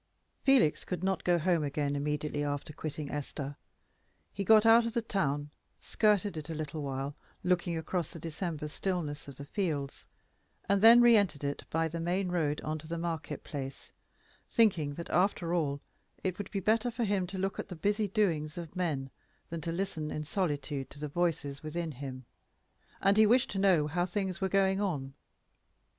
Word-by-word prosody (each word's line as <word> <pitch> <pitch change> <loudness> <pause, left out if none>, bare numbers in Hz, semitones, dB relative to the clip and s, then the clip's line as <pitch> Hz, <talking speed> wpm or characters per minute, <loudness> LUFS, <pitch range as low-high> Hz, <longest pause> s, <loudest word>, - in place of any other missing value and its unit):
_ - - -43
Felix 265 - +4
could 180 -1 -4
not 190 -1 0
go 175 -1 +3
home 170 -1 +2
again 145 0 -1
immediately 150 +1 -1
after 145 +1 -3
quitting 150 -1 -5
Esther. 145 -1 -4 0.8
He 200 - -2
got 215 +2 +6
out 225 +1 +7
of 230 - -4
the 235 -2 0
town, 145 -9 -1 0.3
skirted 210 -3 +2
it 155 +1 -6
a 160 - -3
little 155 0 -4
while, 135 0 -3 0.3
looking 175 -2 +1
across 165 0 -2
the 165 - -9
December 160 -1 -4
stillness 150 -3 -3
of 140 - -9
the 140 - -7
fields, 150 -6 -3 0.6
and 200 0 +3
then 230 +2 +9
re 240 -1 +7
entered 180 -9 +2
it 140 0 -3
by 165 0 +1
the 165 +1 -5
main 180 +3 0
road 155 -4 0
into 155 0 -4
the 170 +1 -3
market 165 -3 -4
place, 135 -2 -6 0.6
thinking 175 - +3
that, 170 - -6
after 175 -2 +2
all, 145 -5 0 0.4
it 185 0 -2
would 205 - -4
be 200 - -2
better 220 +5 +2
for 235 0 -2
him 195 -4 +1
to 190 +1 -6
look 195 +1 -2
at - - -4
the 180 - -7
busy 205 +5 +1
doings 170 -7 0
of 170 0 -7
men 145 -7 -1 0.4
than 165 -1 -4
to 165 - -2
listen 170 -4 -2
in 150 - -3
solitude 145 -5 -2
to 145 - -13
the 150 0 -4
voices 145 -3 -1
within 165 +1 -3
him; 130 -2 -7 0.8
and 200 +1 +5
he 215 0 +7
wished 250 +4 +4
to 195 - -2
know 185 -6 +4
how 175 +4 0
things 190 0 -2
were 190 - +1
going 195 0 +3
on. 140 -9 -2
170 Hz, 185 wpm, -31 LUFS, 145-195 Hz, 0.8 s, then